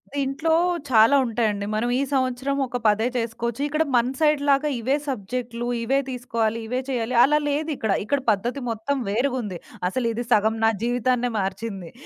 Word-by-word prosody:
దీంట్లో 280 +4 -1 0.4
చాలా 230 +4 +6
ఉంటాయండి. 215 -3 -1
మనం 230 +3 0
ఈ - - +1
సంవత్సరం 260 +1 0
ఒక 245 0 -4
పదే 215 +3 +3
చేసుకోవచ్చు, 235 +2 -3
ఇక్కడ 305 +2 +1
మన 240 +1 +3
సైడ్‌లాగా 295 -1 +3
ఇవే 260 +5 +1
సబ్జెక్టులు, 240 0 -4 0.2
ఇవే 270 +4 +2
తీసుకోవాలి, 230 -3 -1
ఇవే 250 +2 -1
చేయాలి 245 -1 -1
అలా 300 +2 +4
లేదిక్కడ. 285 -7 -1
ఇక్కడ 280 +5 0
పద్ధతి 240 +7 -2
మొత్తం 225 +6 -2
వేరుగుంది. 235 -4 -1 0.3
అసలిది 235 +1 -2
సగం 220 +1 +3
నా - - +6
జీవితాన్నే 245 0 +1
మార్చింది. 195 -2 -4
245 Hz, 145 wpm, -24 LUFS, 225-270 Hz, 0.4 s, చాలా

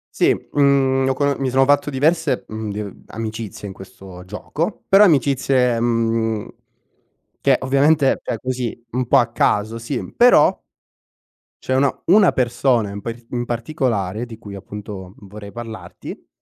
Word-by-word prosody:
Sì, - - +4
mhmm, 135 -2 +2
ne 135 - +1
ho - - +1
cono 140 +1 0
mi 135 -1 -1
sono 135 +1 +4
fatto 145 +1 +2
diverse, 145 0 +1
mhmm, 110 -1 -5
di 105 -1 -7
amicizie 110 -2 -6
in 95 - -8
questo 95 -1 -12
gioco. 165 - -4
Però 195 +2 +7
amicizie, 135 - +2
mhmm, 115 -2 0 0.9
che 135 -2 +4
ovviamente 140 +2 +3
cioè - - -3
così, 125 -2 -4
un 125 +1 -2
po' - - +5
a - - +3
caso, 110 +2 +1
sì, 120 +3 -5
però 245 +1 +5 1.0
c'è 130 - -2
una 135 0 +2
una 195 +1 +5
persona 120 -3 +1
in 100 0 -7
par 115 +2 -5 0.3
particolare, 115 - -2
di 115 -2 -10
cui 100 -3 -10
appunto 100 -1 -9
vorrei 100 +1 -11
parlarti 110 -5 -9
120 Hz, 145 wpm, -20 LUFS, 105-135 Hz, 1.0 s, Però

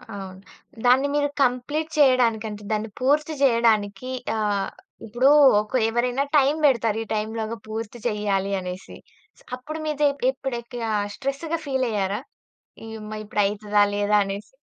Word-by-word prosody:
అవును. 190 -1 -8 0.5
దాన్ని 260 +3 +5
మీరు 290 0 +1
కంప్లీట్ 280 +5 -1
చేయడానికి 250 -6 +4
అంటే, 210 0 -8
దాన్ని 215 +1 -1
పూర్తి 295 +4 +2
చేయడానికి 230 -2 +2 0.2
ఆహ్, 205 -3 0 0.4
ఇప్పుడు 240 +5 +2 0.3
ఒక 215 - -12 0.2
ఎవరైనా 245 +3 0
టైమ్ 280 +2 +3
బెడతారు. 230 -5 +2
ఈ - - -12
టైమ్‌లోగా 220 +1 -3
పూర్తి 225 +2 -6
చేయాలి 200 -3 -1
అనేసి. 180 0 -8 0.6
అప్పుడు 310 +5 -7
మీదె 300 -1 +2 0.2
ఎప్పుడెక్కియా 240 -3 -5 0.2
స్ట్రెస్‌గా 280 +5 -3
ఫీలయ్యారా? 225 -7 -1 0.8
ఇమ్మా! 215 0 -7
ఇప్పుడు 210 0 0
అయితదా 205 0 +1
లేదా 205 +1 +1
అనేసి. 200 +5 -7
230 Hz, 125 wpm, -24 LUFS, 210-265 Hz, 0.8 s, దాన్ని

